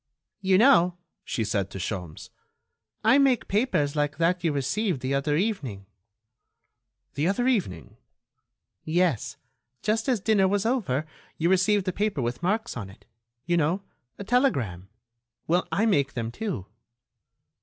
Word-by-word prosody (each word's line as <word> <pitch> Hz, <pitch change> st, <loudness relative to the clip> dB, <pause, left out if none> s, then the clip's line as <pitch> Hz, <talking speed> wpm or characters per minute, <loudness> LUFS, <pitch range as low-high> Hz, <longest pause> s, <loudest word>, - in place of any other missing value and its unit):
"You 190 Hz, -1 st, +3 dB
know," 185 Hz, -7 st, +5 dB, 0.3 s
she 115 Hz, -, -2 dB
said 100 Hz, -3 st, -1 dB
to -, -, -8 dB
Sholmes, 90 Hz, -4 st, -5 dB, 0.7 s
"I 270 Hz, -, +5 dB
make 265 Hz, -4 st, +3 dB
papers 195 Hz, -, +1 dB
like 145 Hz, -1 st, 0 dB
that 175 Hz, +2 st, +1 dB
you 165 Hz, -, +2 dB
received 145 Hz, -, -1 dB
the 130 Hz, +1 st, -1 dB
other 145 Hz, +2 st, +1 dB
evening." 145 Hz, -, -2 dB, 1.3 s
"The 150 Hz, +3 st, 0 dB
other 220 Hz, +6 st, +1 dB
evening?" 180 Hz, -, -1 dB, 0.9 s
"Yes, 165 Hz, -, 0 dB, 0.5 s
just 220 Hz, +4 st, 0 dB
as 245 Hz, -4 st, +2 dB
dinner 200 Hz, -1 st, +3 dB
was 200 Hz, +2 st, 0 dB
over, 195 Hz, -, 0 dB, 0.3 s
you 170 Hz, +3 st, +1 dB
received 190 Hz, +1 st, +2 dB
a 185 Hz, -, 0 dB
paper 205 Hz, -, -1 dB
with 120 Hz, +3 st, -3 dB
marks 215 Hz, +6 st, -1 dB
on 105 Hz, -6 st, -6 dB
it... 95 Hz, -, -17 dB, 0.4 s
you 175 Hz, 0 st, +1 dB
know, 170 Hz, +5 st, +1 dB, 0.3 s
a -, -, -6 dB
telegram.... 135 Hz, -, 0 dB, 0.6 s
Well, 175 Hz, +3 st, +1 dB
I 200 Hz, +7 st, +2 dB
make 140 Hz, -11 st, +2 dB
them, 115 Hz, -1 st, -3 dB
too." 185 Hz, -, -4 dB
175 Hz, 145 wpm, -26 LUFS, 135-210 Hz, 1.3 s, know